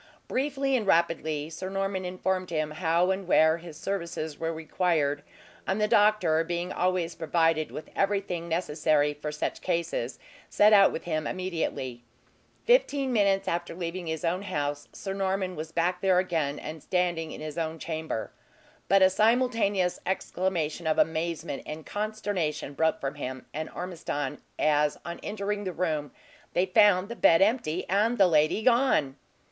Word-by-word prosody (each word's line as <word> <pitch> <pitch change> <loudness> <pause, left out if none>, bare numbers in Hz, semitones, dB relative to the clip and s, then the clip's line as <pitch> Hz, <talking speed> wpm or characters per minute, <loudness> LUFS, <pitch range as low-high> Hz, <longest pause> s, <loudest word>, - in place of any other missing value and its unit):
Briefly 270 0 0
and 220 -5 -1
rapidly 160 -4 +1
Sir 185 +4 -5
Norman 195 -1 -2
informed 185 0 -2
him 155 -2 -1
how 170 +3 +1
and 190 -1 -3
where 160 -2 +5
his 165 -3 -10
services 170 -6 -4
were 165 0 -1
required; 160 -3 0 0.5
and 190 +2 0
the 210 - +2
doctor 210 -7 +4
being 175 +2 -3
always 180 -2 0
provided 165 -1 +1
with 155 - -8
everything 195 -4 -1
necessary 155 -3 +1
for 150 +1 -5
such 150 - -3
cases, 170 -8 -2 0.3
set 210 +1 +5
out 200 -1 +7
with - - -5
him 155 -3 -2
immediately. 160 -9 -3 0.6
Fifteen 285 - +3
minutes 195 -3 +2
after 170 0 -2
leaving 175 0 -4
his 160 +2 -3
own 175 +3 0
house, 145 -7 -3
Sir 195 - -5
Norman 190 -1 -1
was 155 0 -6
back 180 +2 0
there 190 -2 +3
again, 160 -6 0
and 155 0 -7
standing 175 -2 0
in - - -8
his 155 +1 -5
own 160 0 -2
chamber. 160 -7 -4 0.6
But 195 0 +5
a 190 - +7
simultaneous 215 -3 +2
exclamation 175 -3 -2
of 155 - +2
amazement 165 -2 0
and 155 0 -7
consternation 205 -9 -3
broke 160 +3 +1
from 135 +1 -3
him 130 -3 -6
and 155 +1 -4
Ormiston, 155 -5 -4 0.2
as 150 -1 +2
on 170 0 -6
entering 205 0 -3
the 185 - -3
room 155 -5 -1 0.4
they 180 - +2
found 195 -1 +4
the 235 - -6
bed 165 -5 +5
empty, 195 -6 0
and 215 +5 +2
the 195 - +6
lady 155 +4 +3
gone! 235 - +3
175 Hz, 155 wpm, -28 LUFS, 155-195 Hz, 0.6 s, out